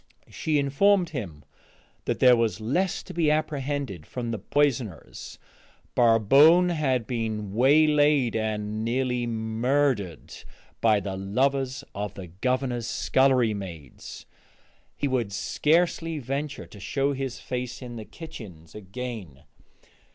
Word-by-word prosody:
She 155 -2 0
informed 175 +7 +3
him 90 - -6 0.6
that - - -1
there 125 -1 +7
was 115 -2 0
less 175 - -1
to - - -10
be 165 -2 +2
apprehended 145 - -2
from 120 -2 -4
the 115 - -3
poisoners. 125 - -2 0.6
Barbone 135 - +5
had 135 -8 0
been 110 -4 -3
waylaid 145 0 +4
and 110 -1 -2
nearly 125 0 -1
murdered 115 - -1 0.4
by 110 -3 +4
the 95 -1 -4
lovers 130 +7 0
of 100 0 -5
the 95 - -7
Governor's 120 +6 -2
scullery 130 -2 +2
maids; 85 -9 -9 0.7
he 145 - 0
would 125 -6 -1
scarcely 165 - +1
venture 140 +2 -4
to 105 - -14
show 140 +8 -1
his 135 -2 -4
face 125 -1 -5
in 125 -2 -8
the 110 - -6
kitchens 100 - -11
again. 105 - -7
125 Hz, 120 wpm, -26 LUFS, 105-140 Hz, 0.7 s, there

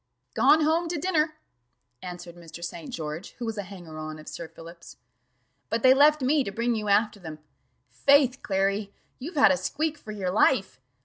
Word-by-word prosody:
"Gone 315 - +5
home 320 +3 +2
to 340 0 -3
dinner," 310 -2 0 0.7
answered 175 -1 -8
Mr. 170 0 -11
St. 170 -2 -6
George, 155 +2 -6
who 240 - -5
was 225 -2 -4
a - - 0
hanger 175 -5 -10
on 155 0 -6
of 155 - -13
Sir 170 - -7
Philip's; 170 +1 -13 0.7
"but 230 0 -1
they 260 0 +8
left 295 +1 +4
me 285 +2 +3
to 200 - -5
bring 235 +4 0
you 215 -2 -3
after 210 +1 +2
them. 160 -4 -8 0.5
Faith, 275 -2 +3
Clary, 195 +1 -1 0.3
you've 315 +7 -7
had 280 - +6
a 185 - +2
squeak 300 - -2
for 215 - -9
your 195 -4 -3
life! 195 - +2
205 Hz, 185 wpm, -26 LUFS, 175-280 Hz, 0.7 s, they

